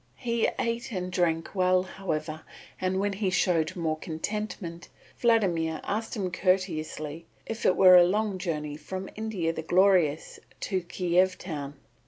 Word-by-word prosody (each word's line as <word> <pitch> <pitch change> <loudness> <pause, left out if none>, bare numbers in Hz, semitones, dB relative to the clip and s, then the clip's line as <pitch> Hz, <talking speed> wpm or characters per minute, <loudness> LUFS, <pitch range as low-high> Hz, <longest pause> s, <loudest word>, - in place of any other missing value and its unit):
He 235 -2 +1
ate 235 +3 -2
and 185 -3 -3
drank 165 -2 0
well, 185 -1 +3
however, 155 -5 -4 0.4
and 185 0 0
when 200 0 0
he 195 -1 -1
showed 175 -2 +1
more 160 -3 -1
contentment, 175 0 -5 0.3
Vladimir 175 -9 +2
asked 220 +4 -3
him 190 -4 -2
courteously 165 -4 -1 0.2
if 225 0 -2
it 185 - +4
were 185 -1 +9
a 175 - +8
long 200 +1 0
journey 150 -5 -3
from 185 +5 -6
India 210 -7 -2
the 160 - -4
Glorious 175 -3 +2 0.2
to 190 -2 -1
Kiev 180 +1 +1
town. 145 -5 -6
185 Hz, 145 wpm, -28 LUFS, 165-195 Hz, 0.4 s, were